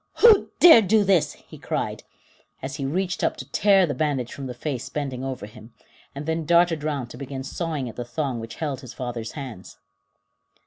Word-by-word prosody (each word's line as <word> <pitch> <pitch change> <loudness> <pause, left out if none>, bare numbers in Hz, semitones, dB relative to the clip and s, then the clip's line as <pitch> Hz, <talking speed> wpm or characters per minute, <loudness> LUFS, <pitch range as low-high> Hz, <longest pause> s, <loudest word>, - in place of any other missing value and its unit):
] - - -50
"Who 445 -4 +7
dared 235 - +8
do 215 +2 +4
this?" 190 -5 +2
he - - -15
cried, - - -3 0.6
as 135 +1 -4
he 135 - -2
reached 180 +4 -2
up - - +1
to - - -7
tear 195 -2 +4
the 145 - -2
bandage 135 -3 -1
from 135 -1 -6
the 125 - -6
face 130 -1 -4
bending 135 -4 -4
over 130 -5 -4
him, 110 +2 -14 0.4
and 140 +2 -6
then 160 +1 -1
darted 170 -1 +3
round 140 -6 -3
to - - -9
begin 135 0 -6
sawing 155 -3 -3
at 115 - -9
the 120 - -3
thong 130 0 -3
which 115 0 -8
held 145 -5 -3
his 125 -2 -10
father's 120 -3 -5
hands. 125 -10 -8
140 Hz, 205 wpm, -24 LUFS, 125-165 Hz, 0.6 s, dared